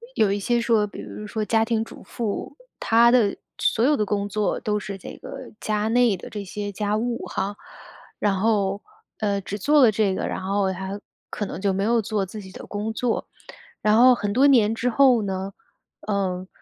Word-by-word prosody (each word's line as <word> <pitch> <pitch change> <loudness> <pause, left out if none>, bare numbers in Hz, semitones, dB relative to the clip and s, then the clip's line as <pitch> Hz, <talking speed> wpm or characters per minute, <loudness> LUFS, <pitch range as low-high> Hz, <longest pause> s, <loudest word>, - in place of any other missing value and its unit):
有 205 -2 +3
一 205 - 0
些 240 +4 +1
说 225 -3 +3
比 - - -10
如 210 - -8
说 220 0 -2
家 225 +1 +2
庭 225 -1 0
主 - - -12
妇， 225 -4 -4 0.2
她 230 +1 +5
的 230 -5 +3 0.2
所 225 - +1
有 290 +3 +4
的 210 - +1
工 205 0 -1
作 210 0 -1
都 210 -1 -1
是 200 -1 -6
这 190 - -10
个 265 -2 -9
家 215 0 -1
内 235 -3 +3
的 - - -10
这 205 -1 -5
些 205 +1 -5
家 205 +1 -1
务 235 +1 -2
哈。 200 +1 -3 0.6
然 200 -2 +1
后， 200 -2 +1 0.4
呃， 200 -2 0
只 200 +1 -5
做 290 +7 +4
了 235 - +7
这 205 -2 +1
个， - - -2
然 - - -4
后 195 0 0
她 190 +2 -5 0.3
可 210 - -3
能 190 - -6
就 200 -1 +1
没 195 +1 -1
有 230 +2 +2
做 205 -2 -1
自 210 +3 -8
己 190 -1 -12
的 - - -10
工 210 +2 -3
作， 235 0 -1 0.5
然 215 0 +4
后 250 +2 +8
很 205 -3 -2
多 265 +5 +5
年 225 -6 +5
之 245 +2 0
后 250 -2 +4
呢， 190 0 -3 0.5
呃， 190 -3 -1
210 Hz, 220 characters per minute, -24 LUFS, 200-230 Hz, 0.6 s, 后